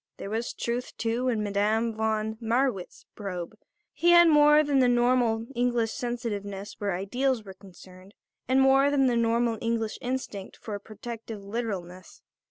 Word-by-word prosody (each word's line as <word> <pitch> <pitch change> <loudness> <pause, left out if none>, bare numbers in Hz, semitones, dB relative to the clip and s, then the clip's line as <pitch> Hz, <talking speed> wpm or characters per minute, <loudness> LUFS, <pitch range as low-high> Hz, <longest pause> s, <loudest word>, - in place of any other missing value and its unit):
There 195 - -7
was 225 +2 -2
truth, 240 +1 -4
too, 235 +3 -1
in 225 -4 0
Madame 210 +3 0
von 220 0 -1
Marwitz's 230 -4 -1
probe. 185 -3 -6 0.4
He 345 - +2
had 345 0 +8
more 300 0 +6
than 285 -2 +2
the 255 - +4
normal 240 -2 +2
English 240 -2 0
sensitiveness 210 -6 -4
where 200 -3 -1
ideals 245 +6 -1
were 195 -2 -10
concerned 185 0 -16 0.3
and 260 +1 +3
more 270 +1 +5
than 280 -2 +2
the 245 -2 +2
normal 230 -1 +1
English 230 -1 -2
instinct 245 -6 -5
for 215 - -8
a 205 - -4
protective 220 0 -8
literalness. 195 -4 -6
230 Hz, 155 wpm, -27 LUFS, 205-250 Hz, 0.4 s, had